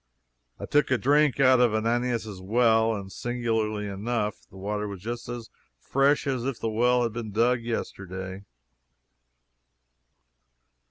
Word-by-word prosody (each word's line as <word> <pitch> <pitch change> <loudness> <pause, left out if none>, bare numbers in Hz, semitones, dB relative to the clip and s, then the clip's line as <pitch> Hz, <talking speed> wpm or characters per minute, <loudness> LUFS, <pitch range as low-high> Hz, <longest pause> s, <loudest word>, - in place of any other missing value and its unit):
I - - -5
took 150 0 +2
a 130 - +3
drink 145 +2 +3
out 130 -2 +6
of 120 -3 +3
Ananias' 115 -3 -1
well, 115 +2 +3
and 100 -2 -7
singularly 110 -3 -2
enough, 105 +2 -3
the 95 - -14
water 105 +2 -3
was 100 -2 -7
just 120 +1 -5
as 120 -2 -6 0.3
fresh 140 - +2
as 130 -4 -1
if 135 -2 -3
the 115 - -2
well 125 +2 +3
had 115 -2 -1
been 115 -2 -5
dug 120 +3 +2
yesterday. 95 -4 -5
115 Hz, 140 wpm, -26 LUFS, 105-125 Hz, 0.3 s, out